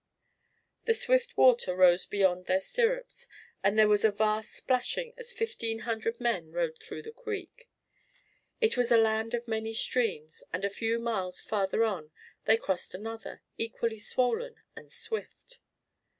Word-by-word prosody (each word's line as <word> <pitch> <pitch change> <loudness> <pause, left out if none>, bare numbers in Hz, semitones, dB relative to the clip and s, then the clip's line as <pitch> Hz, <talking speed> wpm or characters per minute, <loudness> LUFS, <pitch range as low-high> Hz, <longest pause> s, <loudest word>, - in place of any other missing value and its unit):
The 455 - +3
swift - - +1
water 240 -8 +5
rose 180 -1 +5
beyond 185 -3 +2
their 185 +1 +3
stirrups 485 - -1 0.4
and 200 +2 +3
there 215 -1 +7
was 210 -1 +3
a 220 - +6
vast 215 +1 0
splashing 370 - -1
as 485 -1 -8
fifteen 230 - -2
hundred 230 0 -2
men 240 -1 -1
rode - - -2
through 445 -1 -7
the 455 - -8
creek. 460 +1 -7 0.9
It 450 -2 +3
was 245 -1 +1
a 235 - +8
land 225 +1 +2
of 240 0 -5
many 220 0 -2
streams, 220 -11 -1
and 195 - -1
a 200 - -1
few 225 +3 0
miles 215 -6 -2
farther 205 +1 0
on 185 -9 -1 0.4
they 220 - +5
crossed 190 -4 -2
another, 225 +3 -7 0.2
equally 225 0 -2
swollen 255 - 0 0.2
and - - -12
swift. 475 +2 -6
230 Hz, 150 wpm, -30 LUFS, -, 0.9 s, a